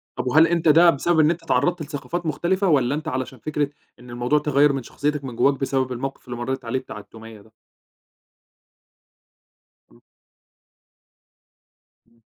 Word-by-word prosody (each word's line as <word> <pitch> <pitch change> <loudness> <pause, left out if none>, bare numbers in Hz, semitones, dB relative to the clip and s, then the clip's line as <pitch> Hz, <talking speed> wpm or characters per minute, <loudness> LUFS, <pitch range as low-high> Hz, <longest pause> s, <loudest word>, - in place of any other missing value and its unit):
طَب - - -4
وهل 155 +6 +5
أنت 170 0 0
ده 165 +3 +7
بسبب 165 +2 +1
إن 155 +1 +5
أنت 170 0 -5
اتعرّضت 165 +4 0
لثقافات 150 +3 -5
مختلفة، 185 +5 0
والّا 140 -5 +2
أنت 155 +1 -6
علشان 130 -2 -4
فكرة 150 +2 -2 0.3
إن 125 - -14
الموضوع 120 +5 0
تغيّر 145 -1 +3
من 135 -2 -3
شخصيتك 145 +3 -3
من 125 -3 -7
جواك 140 +3 +2
بسبب 135 -1 -1
الموقِف 135 +2 -5
اللي 120 -2 -6
مرّيت 130 +1 -4
عليه 115 +3 -1
بتاع 115 -5 -10
التومية 110 0 -13
ده؟ 110 +2 -22 2.4
إمم. - - -22 2.1
إمم. 115 0 -32
140 Hz, 150 wpm, -22 LUFS, 125-155 Hz, 2.4 s, ده